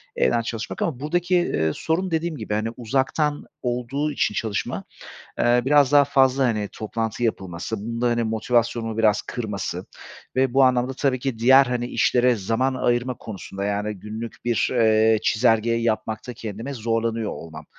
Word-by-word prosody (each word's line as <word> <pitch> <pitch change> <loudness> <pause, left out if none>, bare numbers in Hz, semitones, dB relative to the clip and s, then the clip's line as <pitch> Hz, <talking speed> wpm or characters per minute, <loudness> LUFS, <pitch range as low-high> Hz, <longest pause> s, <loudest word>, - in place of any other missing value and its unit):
evden 90 - +2
çalışmak 115 0 -5
ama 135 -7 -1
buradaki, 175 +5 0
eee, 80 - +1
sorun 170 +3 -1
dediğim 160 -1 -1
gibi, 110 -2 -4
hani, 110 +2 0
uzaktan 135 +5 0 0.2
olduğu 125 +5 -2
için 105 - 0
çalışma, 110 -2 -2 0.6
eee, 120 0 +4
biraz 145 -1 +4
daha 145 -1 +7
fazla, 135 -1 +3
hani, 105 -4 -1
toplantı 115 +2 -3
yapılması, 95 -1 -2
bunun 115 +2 -4
da, 120 - +3
hani, 120 0 +1
motivasyonumu 115 0 0
biraz 110 -2 +3
kırması 100 -6 -4 0.5
ve 130 -1 +2
bu 135 0 +5
anlamda 130 0 +2
tabii 130 -2 0
ki 125 -4 -3
diğer, 130 +3 +7
hani, 120 0 -2
işlere 125 0 +2
zaman 115 +6 0
ayırma 120 0 0
konusunda, 100 -2 -7
yani, 105 +1 -1
günlük 110 +4 -8
bir, 120 -2 +1
eee, 110 -2 +4
çizelgeyi 115 0 +2
yapmakta 110 +1 -2
kendime 115 +6 -6
zorlanıyor 115 -1 -1
olmam. 80 -2 -9
115 Hz, 155 wpm, -23 LUFS, 110-130 Hz, 0.6 s, daha